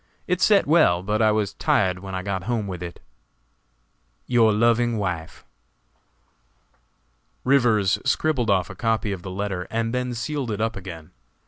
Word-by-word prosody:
It 180 0 -1
set 205 -2 +5
well, 140 - +4
but 105 +3 0
I 110 -1 +4
was 105 -2 -1
tired 95 -2 +1
when 95 0 -7
I 95 - -3
got 95 -2 -3
home 115 -3 -1
with 90 -3 -6
it. 85 -1 -7 1.3
"Your 115 -3 +4
loving 115 +2 +2
wife." 90 -5 -4 2.0
Rivers 115 -7 +3
scribbled 135 -3 0
off 95 -3 +1
a - - -10
copy 115 -2 0
of 95 -3 -5
the 95 - -7
letter 95 -1 -4
and 115 +1 -2
then 125 -1 -2
sealed 130 +2 -3
it 105 -2 -3
up 115 +1 -1
again. 85 -5 -9
110 Hz, 155 wpm, -23 LUFS, 95-120 Hz, 2.0 s, set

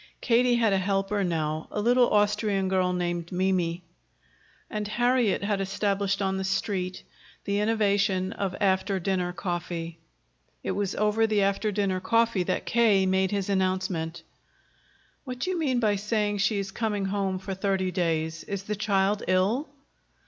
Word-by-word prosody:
Katie 245 0 +3
had 225 -4 +3
a 195 - +2
helper 195 +1 0
now, 155 -3 -2
a - - -3
little 245 +3 +4
Austrian 205 -2 +1
girl 185 -1 +2
named 175 -1 -2
Mimi. 180 -2 0 0.8
And 210 -1 -4
Harriet 240 -2 +1
had 200 -1 0
established 195 0 0
on 190 0 0
the 190 - -2
Street 190 -1 -2 0.4
the 200 0 0
innovation 200 -3 +1
of 190 -2 -3
after 190 0 +1
dinner 180 -1 -1
coffee. 175 -2 -4 0.6
It - - -1
was 200 -1 -2
over 210 +1 +2
the 210 -2 +2
after 200 +2 0
dinner 195 -2 0
coffee 230 -1 +2
that 180 - -1
K. 215 -5 +3
made 190 0 +2
his 200 -1 -2
announcement. 185 -4 -1 1.0
"What 255 -2 -6
do 365 +9 -2
you 360 - -2
mean 265 -6 +1
by 210 -3 +2
saying 210 0 -1
she 215 +1 +2
is 195 -1 -3
coming 210 -2 -1
home 195 -1 -1
for 190 +1 -5
thirty 190 -1 -1
days? 160 -3 -1
Is 200 -1 -4
the 210 +1 -3
child 200 0 +1
ill?" 195 - +1
195 Hz, 155 wpm, -27 LUFS, 185-210 Hz, 1.0 s, little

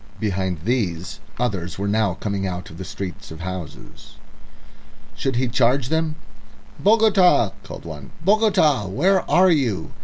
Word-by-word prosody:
Behind 95 -5 -1
these 100 -4 -2 0.2
others 100 -8 -2
were 100 +1 -2
now 100 -3 +1
coming 100 -1 -3
out 90 -1 -5
of 80 - -11
the - - -4
street 95 -3 -7
of 80 +1 -9
houses. 85 -4 -8 1.0
Should 135 -2 -2
he 125 +1 +1
charge 125 +2 +2
them? 160 -1 0 0.6
"Bogota!" 200 - +4
called - - -10
one. 75 -4 -8 0.2
"Bogota! 190 - +3
where 180 - +2
are 185 +1 +5
you?" 115 - 0
110 Hz, 140 wpm, -22 LUFS, 95-155 Hz, 1.0 s, are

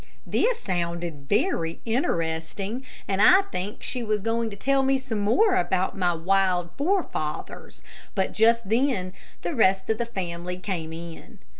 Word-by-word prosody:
This 480 -1 +1
sounded 170 -5 -3
very 205 - +1
interesting, 195 - -1 0.2
and 195 0 0
I 375 - +7
think 205 - -5
she 250 - -2
was 215 -3 -1
going 225 0 0
to 200 - -8
tell 275 +6 +2
me 270 0 +3
some 255 -5 -4
more 370 - +3
about 180 +1 +1
my 180 -3 +2
wild 180 0 +1
forefathers, 365 +6 -2 0.3
but 190 -2 0
just 230 0 +3
then 220 -5 +1 0.3
the - - -2
rest 190 -5 +3
of 220 - -1
the 235 - -1
family 180 -4 -4
came 180 -4 -4
in. 165 0 -9
200 Hz, 150 wpm, -25 LUFS, 175-235 Hz, 0.3 s, I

